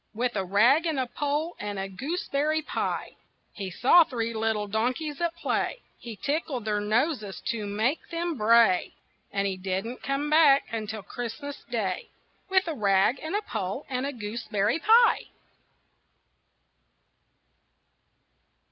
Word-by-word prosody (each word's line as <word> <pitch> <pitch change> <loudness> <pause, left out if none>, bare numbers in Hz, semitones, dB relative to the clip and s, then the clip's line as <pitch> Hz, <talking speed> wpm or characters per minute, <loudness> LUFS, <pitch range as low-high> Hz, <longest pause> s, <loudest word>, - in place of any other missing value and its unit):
With 240 +1 -1
a 195 - 0
rag 235 - +4
and 310 -4 0
a 260 - +1
pole 295 +6 -2
and 205 -1 -4
a 195 0 -3
gooseberry 300 - -1
pie. - - -3 0.4
He 195 -2 -5
saw 260 - +6
three 230 -5 -3
little 220 -1 0
donkeys 250 - -2
at 340 -1 0
play, - - -2 0.2
He 235 -2 -8
tickled 280 -1 -2
their 210 -1 0
noses 215 - 0
to 215 -3 -2
make 220 +9 -1
them 340 -1 -2
bray, 225 -5 +4 0.4
And 200 0 0
he 195 -1 -1
didn't 190 +6 -3
come 275 +2 -1
back 300 -2 +6
until 215 -2 -4
Christmas 260 +7 -6
Day 205 -7 -2 0.4
With 375 -2 +3
a 325 - -1
rag 200 +1 +2
and 315 +5 -3
a 420 - 0
pole 215 - -4
and 260 +1 -1
a - - -2
gooseberry 215 0 -2
pie. 460 +6 +5
240 Hz, 140 wpm, -27 LUFS, 210-300 Hz, 0.4 s, saw